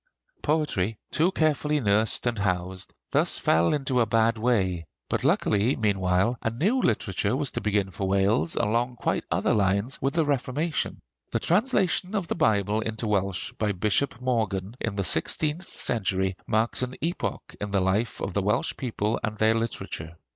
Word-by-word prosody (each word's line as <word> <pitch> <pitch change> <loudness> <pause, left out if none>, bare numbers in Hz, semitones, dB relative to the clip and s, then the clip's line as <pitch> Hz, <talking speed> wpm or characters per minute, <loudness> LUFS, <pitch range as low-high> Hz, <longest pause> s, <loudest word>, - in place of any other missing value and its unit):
Poetry, 140 - 0
too 165 +4 +2
carefully 150 -3 +1
nursed 110 -1 +2
and 120 -3 0
housed, 95 -1 -2 0.2
thus - - +2
fell 80 +1 +3
into 135 -3 0
a 115 - +2
bad 115 +1 +3
way; 95 -8 0 0.2
but - - -1
luckily 105 +5 +2
meanwhile 100 +1 +1
a - - 0
new 195 - +1
literature 110 - 0
was 145 -2 0
to - - -3
begin 100 -2 0
for 95 +1 -3
Wales, 100 - +2
along 120 +3 0
quite - - -1
other - - +1
lines, 100 +5 +1
with 135 +3 0
the 165 -2 +3
Reformation. 145 +3 -1 0.3
The - - -1
translation 195 -1 +1
of 190 -4 -1
the - - -1
Bible 105 - +2
into 110 +1 -3
Welsh 100 -2 -1
by 105 -2 +1
Bishop 110 +7 0
Morgan 110 -5 -1
in 110 -3 -2
the 100 - -1
sixteenth 155 - +1
century 95 -4 0
marks 110 +3 +1
an 125 0 -3
epoch 145 - -3
in 105 - -2
the 100 -1 +1
life 95 +5 0
of 95 - -3
the 100 - +1
Welsh 105 +6 0
people 110 -3 -1
and 110 -1 -2
their 110 +1 +4
literature. 115 -7 -4
110 Hz, 170 wpm, -26 LUFS, 100-135 Hz, 0.3 s, their